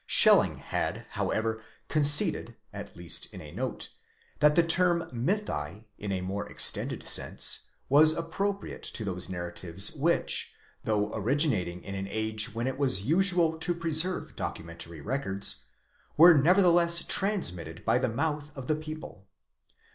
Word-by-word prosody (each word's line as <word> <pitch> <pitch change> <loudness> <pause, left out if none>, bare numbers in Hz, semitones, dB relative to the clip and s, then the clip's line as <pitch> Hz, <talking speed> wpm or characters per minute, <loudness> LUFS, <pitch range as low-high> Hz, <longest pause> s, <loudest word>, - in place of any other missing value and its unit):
Schelling - - +5
had - - -3
however 110 0 -2 0.3
conceded 145 -1 +3 0.2
(at - - -9
least 85 -1 -5
in - - -10
a - - -11
note) - - -5 0.5
that 150 0 +4
the 170 - +5
term 170 0 +1
mythi, 115 - -3
in 105 -1 -4
a 95 -1 -2
more 95 +2 -4
extended - - +1
sense, - - 0 0.2
was 150 +3 +6
appropriate 195 +5 -4
to 110 - -3
those 90 -1 -4
narratives 85 +1 -1
which, 165 +4 0 0.3
though 105 -1 0
originating 110 - 0
in 100 - -7
an 95 0 -4
age 110 0 -2
when 115 +3 -3
it 130 +1 -3
was 130 -9 +2
usual 170 0 +2
to 175 +1 -1
preserve 165 +2 -1
documentary 85 -1 -7
records, 100 - -2 0.5
were 170 +3 +9
nevertheless 170 +2 +4
transmitted 90 - -2
by 125 - +3
the 130 -1 0
mouth 150 +4 -2
of 135 - -6
the 155 - 0
people. 155 -10 -9
135 Hz, 140 wpm, -28 LUFS, -, 0.5 s, were